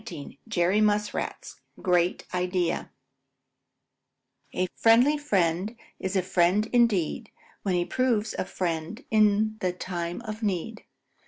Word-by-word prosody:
XIX 165 -10 -8 0.2
JERRY 195 0 +2
MUSKRAT'S 210 0 -1 0.2
GREAT 180 -1 +1
IDEA 180 -1 -1 1.6
A 185 - 0
friendly 240 +6 +5
friend 195 - 0 0.2
is 190 +1 -3
a 190 - +2
friend 185 +4 +2
indeed 230 -2 +2 0.3
When 190 -3 0
he 175 0 +1
proves 235 -3 0
a - - 0
friend 175 +6 -3
in 215 0 +3
the 185 -2 0
time 175 +1 -4
of 215 -1 -7
need. 215 +2 -3
200 Hz, 115 wpm, -27 LUFS, 180-220 Hz, 1.6 s, friendly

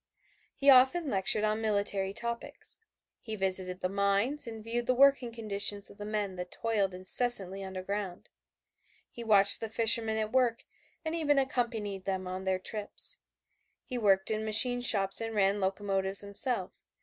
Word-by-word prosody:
He 275 - -4
often 265 +5 +4
lectured 195 +2 0
on 215 +1 -1
military 200 -2 -1
topics. 235 +3 -6 0.4
He 220 -4 -7
visited 185 -2 -2
the - - 0
mines 200 +9 -1
and 225 -1 -8
viewed 235 +1 -4
the 255 - +1
working 275 -2 +3
conditions 205 -3 0
of 200 - -19
the 205 - -7
men 205 -3 -3
that 180 0 -6
toiled 205 -4 -2
incessantly 195 0 +2
underground. 190 0 -6 0.8
He 235 - -9
watched 200 -3 +4
the 225 - -5
fishermen 225 0 +2
at 215 0 -3
work 245 -3 0 0.4
and 315 - -3
even 300 -4 0
accompanied 230 -7 -2
them 190 -1 -3
on 185 +1 -6
their 190 0 0
trips; 210 - -7 0.7
he 250 -2 -5
worked 195 -2 +2
in 215 0 -2
machine 245 +3 +6
shops 195 -4 +2
and 225 -1 -5
ran 200 0 +1
locomotives 195 0 -1
himself. 200 0 -3
210 Hz, 155 wpm, -29 LUFS, 195-235 Hz, 0.8 s, machine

